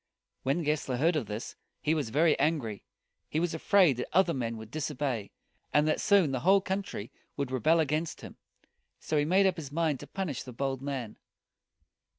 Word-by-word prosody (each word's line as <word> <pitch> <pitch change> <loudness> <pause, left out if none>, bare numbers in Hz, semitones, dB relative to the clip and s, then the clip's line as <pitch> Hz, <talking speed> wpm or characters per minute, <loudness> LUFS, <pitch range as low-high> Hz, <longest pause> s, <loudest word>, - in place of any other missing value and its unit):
When 140 +6 0
Gessler 145 -4 -1
heard 165 +6 +2
of 140 -8 -1
this, 105 +3 -5 0.2
he 155 - +1
was 150 -8 -1
very 155 +6 +4
angry. 130 -11 0 0.5
He 155 - 0
was 170 -1 0
afraid 165 - +4
that 125 - -3
other 180 -1 +3
men 115 -3 -3
would 110 0 -10
disobey, 140 -8 -2 0.4
and 150 +1 +3
that 155 - +1
soon 200 -8 +4
the 130 - -1
whole 190 +7 +5
country 190 - -4 0.3
would 140 -2 -2
rebel 155 +6 +3
against 155 +1 -1
him. - - -10 0.6
So 155 - -3
he 145 -1 +3
made 190 +5 +4
up 185 -2 +2
his 145 -4 -7
mind 155 -3 0
to - - -9
punish 185 -9 -3
the 125 - -9
bold 135 +1 -2
man. 135 -6 -5
150 Hz, 185 wpm, -30 LUFS, 130-165 Hz, 0.6 s, whole